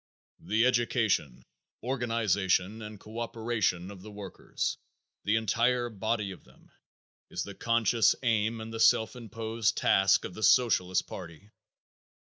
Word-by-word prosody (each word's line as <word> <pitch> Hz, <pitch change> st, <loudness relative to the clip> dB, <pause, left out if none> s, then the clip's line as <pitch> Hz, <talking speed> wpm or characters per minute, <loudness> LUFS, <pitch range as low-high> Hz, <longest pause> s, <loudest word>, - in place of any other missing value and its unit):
The 110 Hz, +7 st, +1 dB
education, 115 Hz, -, +1 dB, 0.4 s
organization 110 Hz, -5 st, 0 dB
and 105 Hz, -1 st, -8 dB
co 110 Hz, +3 st, -9 dB
operation 110 Hz, -6 st, -1 dB
of 95 Hz, -2 st, -11 dB
the 110 Hz, -, -10 dB
workers, 100 Hz, -2 st, -5 dB, 0.5 s
the 100 Hz, +2 st, +2 dB
entire 120 Hz, +3 st, +1 dB
body 105 Hz, -1 st, -2 dB
of 90 Hz, -, -11 dB
them, -, -, -23 dB, 0.6 s
is 90 Hz, -, -3 dB
the 100 Hz, -, -8 dB
conscious 115 Hz, +2 st, +2 dB
aim 115 Hz, -1 st, +1 dB
and 110 Hz, 0 st, -7 dB
the 115 Hz, -, -5 dB
self 110 Hz, +1 st, +4 dB
imposed 115 Hz, -1 st, -2 dB
task 95 Hz, 0 st, +3 dB
of -, -, -7 dB
the 110 Hz, -, -9 dB
Socialist 95 Hz, -7 st, +3 dB
party. 90 Hz, +3 st, -10 dB
110 Hz, 130 wpm, -29 LUFS, 95-115 Hz, 0.6 s, self